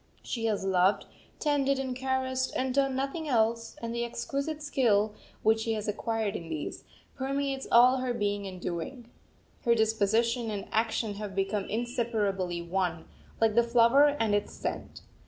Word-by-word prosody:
She 230 -2 -3
has 210 -3 0
loved, 190 +1 +3 0.3
tended, 280 -2 +1
and 260 -2 -3
caressed, 260 0 -1
and 260 0 0
done 275 -1 +2
nothing 275 +4 -2
else; 230 -1 +1
and 230 0 -3
the 235 0 -1
exquisite 275 +6 -3
skill 220 -7 +2 0.3
which 220 +1 +4
she 225 0 -1
has 215 -1 -3
acquired 220 0 -1
in 165 -1 -6
these, 155 -2 -5 0.3
permeates 275 0 -2
all 250 +2 +7
her 255 -1 -1
being 205 -3 -1
and 185 -1 -8
doing. 205 +9 -5 0.5
Her 235 -2 +4
disposition 225 +2 +1
and 205 -2 -4
action 225 -1 0
have 200 -2 -5
become 195 +1 0
inseparably 210 -7 -1
one, 175 -1 -1 0.3
like 225 -1 +3
the 235 - +5
flower 245 +5 +5
and 220 -2 +1
its 205 0 0
scent. - - -5
230 Hz, 155 wpm, -29 LUFS, 205-260 Hz, 0.5 s, all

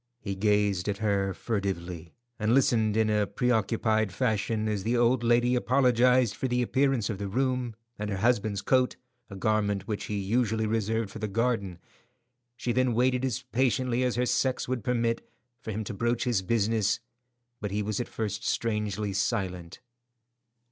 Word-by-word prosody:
He 100 - -4
gazed 105 -1 +1
at 100 - -1
her 100 -2 0
furtively, 90 -6 -4 0.2
and 110 +3 +2
listened 110 -5 +3
in 110 -1 +3
a 105 -1 +1
preoccupied 110 -1 +1
fashion 110 -1 0
as 105 -2 -1
the 115 +5 0
old 120 +1 +3
lady 120 +1 +3
apologized 125 -2 +3
for 130 - -2
the 125 0 +1
appearance 130 -3 +1
of 100 - -5
the 100 - -3
room, 125 +1 -1 0.2
and 105 0 -3
her 100 - -2
husband's 105 -1 +1
coat, 130 -1 +2 0.3
a 100 - -8
garment 105 -1 0
which 105 -2 -3
he 105 - -3
usually 110 +2 0
reserved 110 -1 -1
for 110 - -8
the 110 - -2
garden. 110 -4 -1 0.8
She 125 - -2
then 125 -1 +1
waited 125 +1 +2
as 130 -5 -1
patiently 125 +1 0
as 125 -1 +1
her 125 +1 +1
sex 130 +1 0
would 125 -3 -2
permit, 115 -1 0 0.4
for - - -9
him 110 0 -3
to 105 - -5
broach 120 +3 0
his 120 -6 +1
business, 110 0 +1 0.6
but 105 - -3
he 105 +2 -1
was 105 0 -2
at 120 - -2
first 105 -1 -4
strangely 105 -2 -1
silent. 95 -2 -2
110 Hz, 170 wpm, -28 LUFS, 100-120 Hz, 0.8 s, listened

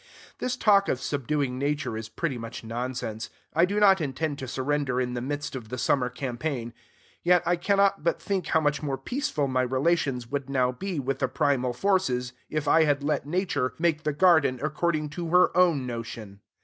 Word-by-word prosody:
This 250 0 -2
talk 200 -4 +4
of 130 - 0
subduing 140 -2 -2
Nature 145 -4 -1
is 110 0 -6
pretty 150 +3 -2
much 115 0 -7
nonsense. 115 -1 -4 0.2
I 165 +2 +4
do 200 +3 -1
not 195 -3 +5
intend 145 +1 -2
to 130 - -5
surrender 135 0 -1
in 125 -1 -1
the 120 - -3
midst 145 +2 -4
of 115 -4 -7
the 125 - -4
summer 125 0 +1
campaign, 125 -1 -4 0.5
yet 180 0 +4
I 175 +1 +3
cannot 200 +1 +2
but 170 - +1
think 190 -5 -2
how 160 - +2
much 150 -1 0
more 140 -3 -2
peaceful 200 - -2
my 130 -1 +1
relations 130 0 0
would 140 +2 -4
now 130 -2 +2
be 175 +5 -4
with 135 0 -2
the 130 - +1
primal 130 -2 0
forces, 125 -7 0 0.2
if 155 -1 -2
I 160 +2 +5
had, 145 -1 +1
let 145 -1 -1
Nature 150 -6 -1
make 165 -2 +1
the 155 -1 0
garden 155 -5 +4
according 155 0 0
to 170 +3 -5
her 180 +1 +4
own 170 -7 +3
notion. 115 -4 -6
145 Hz, 190 wpm, -27 LUFS, 125-170 Hz, 0.5 s, not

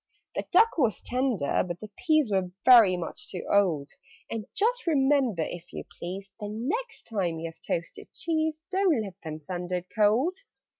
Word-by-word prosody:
"The - - -3
duck 450 -6 +5
was 235 -7 +2
tender, 250 - 0
but 175 -1 -5
the 215 -1 -9
peas 310 - +2
Were 190 -2 +1 0.2
very 225 -8 +8
much 170 -2 -6
too 180 - -5
old: 170 -8 +2 0.4
And 225 -2 -4
just 475 +1 +1
remember, 270 - +3
if 175 0 -8
you - - -5 0.2
please, 190 +3 -6
The 205 -1 -5
next 330 - -3
time 185 -7 -2
you 165 0 -4
have 165 - -28
toasted 165 0 -4
cheese, 315 -1 -1
Don't 375 - +2
let 195 -3 -7
them 155 -2 -5
send 175 +3 -6
it 180 -1 -1
cold. 230 - +3
215 Hz, 170 wpm, -27 LUFS, 180-300 Hz, 0.4 s, very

